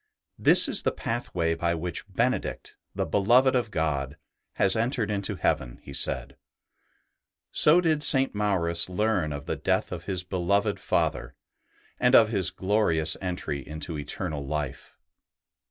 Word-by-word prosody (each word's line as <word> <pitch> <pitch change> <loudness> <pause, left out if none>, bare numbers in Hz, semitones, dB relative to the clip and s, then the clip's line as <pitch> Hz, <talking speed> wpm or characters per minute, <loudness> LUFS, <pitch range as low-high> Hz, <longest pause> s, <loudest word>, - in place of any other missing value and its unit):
" - - -38
This - - +7
is - - +2
the - - 0
pathway 90 -8 -3
by 85 +1 -1
which 90 +4 -6
Benedict, 120 +7 -2 0.2
the - - -1
beloved 120 +7 +3
of 120 -4 0
God, 75 -5 -2 0.4
has 95 -1 +2
entered 115 -1 -1
into 100 0 -3
heaven," 75 -8 -2
he 70 - -10
said. 70 0 -3 1.1
So 155 +4 +7
did 160 -3 +1
St. 135 -2 +4
Maurus 90 -5 +2
learn 95 -4 -1
of 70 0 -6
the - - -3
death - - -1
of - - -7
his 95 -2 -2
beloved 95 +2 -1
Father, - - -2 0.6
and 125 - +4
of 110 -2 +6
his 95 -6 +1
glorious 95 -5 0
entry 90 -6 -4
into 75 +4 -7
eternal 75 +1 -4
life. 75 0 -6
90 Hz, 145 wpm, -26 LUFS, 80-110 Hz, 1.1 s, This